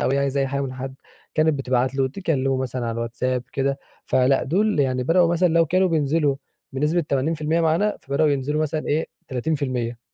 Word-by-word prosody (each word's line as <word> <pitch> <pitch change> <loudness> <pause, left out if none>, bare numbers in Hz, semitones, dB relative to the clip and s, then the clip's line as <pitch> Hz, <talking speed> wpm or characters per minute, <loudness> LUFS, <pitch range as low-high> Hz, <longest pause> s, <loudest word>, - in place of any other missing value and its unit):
أو - - +1
هي 140 - +2
عايزة 140 0 0
أي 135 - +1
حاجة 140 +1 -2
من 130 -2 -3
حد 130 +1 -6 0.4
كانت 155 0 +3
بتبعت 130 0 0
له، 135 -1 +1
تكلمه 135 -5 -1
مثلًا 130 -1 -3
على 115 - -1
الواتس 115 +1 -5
آب 125 -1 +1
كده. 140 0 0 0.3
فلأ 130 +1 +3
دول 195 +2 +1
يعني 130 -2 +1
بدأوا 170 +4 +3
مثلًا 175 +1 +3
لو 165 0 +3
كانوا 185 +4 +2
بينزلوا 150 -3 +1 0.4
بنسبة 150 +6 +1
80% 155 +2 0
معانا 165 +6 +2
فبدأوا 140 +3 +1
ينزلوا 145 +2 0
مثلًا 155 0 -2
إيه 155 +2 0 0.2
30%. 130 -3 -2
140 Hz, 190 wpm, -23 LUFS, 130-160 Hz, 0.4 s, كانت